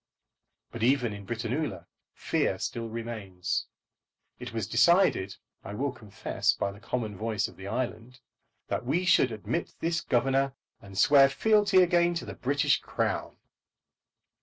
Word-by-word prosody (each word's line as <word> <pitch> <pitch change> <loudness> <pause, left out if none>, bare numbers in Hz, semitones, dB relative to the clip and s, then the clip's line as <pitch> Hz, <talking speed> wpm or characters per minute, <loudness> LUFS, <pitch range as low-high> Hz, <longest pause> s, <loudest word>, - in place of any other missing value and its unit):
But 115 - -7
even 125 -2 +2
in 100 -1 -9
Britannula 120 +6 -3 0.3
fear - - 0
still 115 -1 -4
remains. 110 -6 -4 0.7
It - - -7
was 110 -3 -2
decided, 115 - +3 0.3
I 100 - -7
will 140 +4 -1
confess 110 -5 -1
by 100 - -2
the 100 - -13
common 110 -3 -3
voice 110 0 -1
of - - -14
the 95 +1 -9
island, 125 +2 -4 0.5
that - - -2
we 165 +9 0
should 135 -8 +4
admit 110 - -4
this 165 0 0
Governor, 135 +1 +1 0.3
and 100 -1 -11
swear 140 +2 +6
fealty 205 +4 +4
again 175 0 +3
to 170 - -3
the - - -7
British 140 +2 +1
Crown. - - -2
120 Hz, 140 wpm, -28 LUFS, 110-145 Hz, 0.7 s, swear